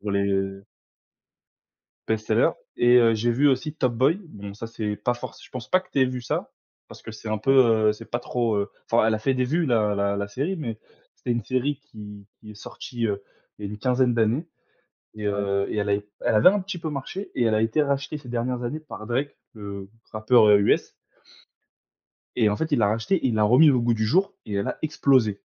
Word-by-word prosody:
pour 105 - -4
les, 100 0 +1
heu 95 0 -2 1.4
bestseller 110 -1 +2 0.3
et 120 0 +5
heu, 115 -1 +4
j'ai 120 +2 +1
vu 145 +5 +3
aussi 150 +3 0
Top 130 -6 0
Boy 140 - +2
bon 100 -5 -9
ça, 115 - -7
c'est 110 -2 -4
pas 120 +3 -1
forc 120 0 -8
je - - -16
pense 125 -3 -7
pas 185 - +3
que - - -22
t'aies 135 -1 +3
vu 125 -1 -4
ça - - -3 0.4
parce - - -13
que - - -8
c'est 110 0 -9
un 110 - -1
peu, 110 +6 0 0.4
heu, - - +1
c'est 115 +1 -12
pas 120 - -1
trop, 120 -3 -1
heu, 100 0 -1 0.2
enfin 115 -1 +3
elle 110 - +2
a 110 - -1
fait 130 +4 0
des 130 - 0
vues 160 +6 0
la 110 -5 +2
la 100 0 0
la 100 0 -3
série, 145 - -2
mais 115 -8 -5 0.4
c'était 120 - -2
une 120 -2 -2
série 130 +4 -1
qui 105 -7 -12
qui 105 -1 -12
est - - -16
sortie, 115 +3 -5
heu, 100 -1 -3 0.3
il 105 - -5
y - - -5
a - - -7
une 105 - -6
quinzaine 125 +1 +2
d'années 115 +8 +1 0.7
et 105 -1 -5
heu, 100 -1 0
et - - -3
elle 105 0 0
a, - - +4 0.3
elle - - 0
avait 105 +10 +7
un 205 +2 +2
petit 185 -1 -6
peu 165 -1 -4
marché 150 +7 -6
et 125 - 0
elle 110 -1 +2
a 110 - +2
été 115 +7 +2
rachetée 140 +1 -2
ces 130 - -14
dernières 120 +1 -2
années 135 +6 -4
par 140 -8 -10
Drake, 135 +4 -2 0.2
le 100 -2 -8 0.2
rappeur, 110 0 +4
heu, 105 - +7
US 100 - +2 1.5
et 110 -3 +4
en 105 - -1
fait, 160 0 -3
il 145 - +2
l'a 105 -3 +3
racheté, 115 - 0
il 120 - 0
l'a 110 - +2
remis 130 +8 +6
au 125 - +2
goût 120 0 +2
du 110 0 -1
jour 190 - +2
et 105 - -6
elle 100 - -1
a - - -3
explosé, 130 -9 +2
115 Hz, 235 wpm, -24 LUFS, 105-130 Hz, 1.5 s, avait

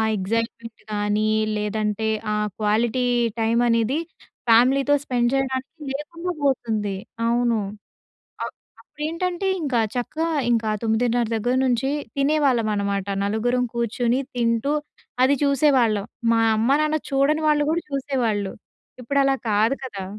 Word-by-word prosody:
Excitement 230 +3 -3
కానీ 210 +1 0 0.3
లేదంటే 210 +1 -1 0.2
ఆ - - +1 0.3
క్వాలిటీ 225 +4 +1 0.3
టైం 225 +1 +2
అనేది 230 +4 +2 0.5
ఫ్యామిలీతో 265 +5 +5
స్పెండ్ 240 -3 +1
చేయడానికి 270 +3 -2
లేకుండా 335 +5 -4
పోతుంది. 220 -7 0 0.3
అవును. 235 -1 +2 0.8
అ - - 0 0.4
అప్పుడేంటంటే 345 +5 -3 0.2
ఇంకా 255 -6 +1
చక్కగా 315 +7 -2 0.2
ఇంకా 225 -2 +1
9:30 230 +1 +1
దగ్గర 245 +3 0
నుంచి 255 +1 +1 0.3
తినేవాళ్ళం 275 -5 +2
అన్నమాట 200 -1 -1 0.2
నలుగురం 245 +4 +1
కూర్చొని 235 +2 0
తింటూ 235 +3 +1 0.5
అది 280 +2 +4
చూసేవాళ్ళం. 260 -7 +3 0.3
మా 225 - +3 0.2
అమ్మా-నాన్న 295 +7 +2
చూడని 280 +3 +2
వాళ్ళు 295 -1 +3
కూడా 340 +1 0
చూసేవాళ్ళు. 240 -8 -1 0.5
ఇప్పుడు 280 +4 -1
అలా 275 0 +3 0.2
కాదు 215 +5 +3
కదా! 200 -7 -6
240 Hz, 115 wpm, -23 LUFS, 220-275 Hz, 0.8 s, ఫ్యామిలీతో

